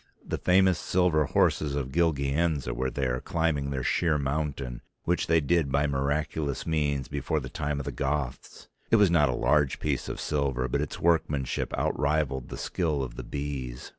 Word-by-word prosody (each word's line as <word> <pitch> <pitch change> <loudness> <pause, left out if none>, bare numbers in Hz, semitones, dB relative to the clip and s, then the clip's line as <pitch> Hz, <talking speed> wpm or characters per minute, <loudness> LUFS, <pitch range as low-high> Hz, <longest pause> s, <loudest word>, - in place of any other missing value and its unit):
The - - -3
famous 95 -1 +4
silver 90 -4 +2
horses 70 +1 +1
of 65 -2 -3
Gilgianza 75 -3 +1
were 65 +1 -1
there 65 -1 -1
climbing 80 -5 0
their 65 -2 -2
sheer 80 +2 +2
mountain, 70 -3 -2 0.2
which 90 +1 0
they 80 0 +4
did 80 -1 +1
by 70 +2 +2
miraculous 70 0 -1
means 75 -4 0
before 70 +2 -1
the 65 -2 -7
time 75 +2 -2
of 70 - -5
the - - -3
Goths. 70 -2 -3 0.2
It - - +5
was 105 -5 +5
not 75 -5 +4
a 60 - 0
large 70 +2 +2
piece - - -1
of - - -5
silver 70 -4 0
but 70 +3 0
its 75 - -4
workmanship 75 -6 +1
outrivalled 70 -4 0
the - - -6
skill 80 -6 -1
of - - -5
the - - -5
bees. 70 -4 -5
70 Hz, 175 wpm, -28 LUFS, 65-80 Hz, 0.2 s, It